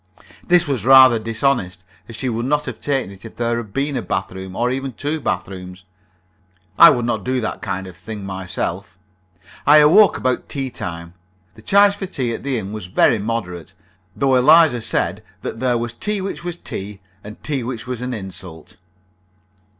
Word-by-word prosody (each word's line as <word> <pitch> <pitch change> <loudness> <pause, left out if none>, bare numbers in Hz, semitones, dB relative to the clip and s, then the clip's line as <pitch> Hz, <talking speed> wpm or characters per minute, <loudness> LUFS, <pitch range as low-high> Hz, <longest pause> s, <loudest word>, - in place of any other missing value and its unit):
This 175 -2 +3
was 130 -8 -1
rather 130 -2 +7
dishonest, 110 -5 -1 0.3
as 115 - -8
she 130 - -3
would 120 0 -2
not 150 +1 +1
have 125 -4 -7
taken 135 -8 -1
it 95 -1 -14
if 115 - -11
there 120 0 -1
had 110 -4 -6
been 140 +4 -1
a 125 - -1
bath - - -3
room, 95 0 -8
or 120 +1 0
even 135 0 -3
two 145 +7 -3
bath 90 -7 -2
rooms. 90 -1 -10 1.0
I - - +11
would 120 -1 +1
not 120 - -2
do 130 0 -1
that 110 - -4
kind 95 -1 -4
of 95 -1 -11
thing 100 +3 -8
myself. 95 0 -5 0.7
I 150 +1 +8
awoke 175 +8 +6
about 130 -1 -2
tea 135 -2 -3
time. 85 -3 -7 0.4
The - - -16
charge 200 0 +5
for 195 -2 -5
tea 125 -9 -2
at - - -6
the 135 -2 -1
inn 100 -1 -5
was 105 -4 -6
very 105 +4 +3
moderate, 95 -6 -5 0.4
though 135 -1 +1
Eliza 130 0 +5
said - - -1 0.2
that 110 - -5
there 125 -1 +1
was 120 0 -4
tea 210 - -2
which 190 -2 -5
was 175 -1 -4
tea, 100 - -7 0.2
and 105 +1 -11
tea 145 -4 -2
which 120 0 -5
was 125 -2 -5
an 125 +1 -3
insult. 95 -6 -9
120 Hz, 190 wpm, -20 LUFS, 95-135 Hz, 1.0 s, I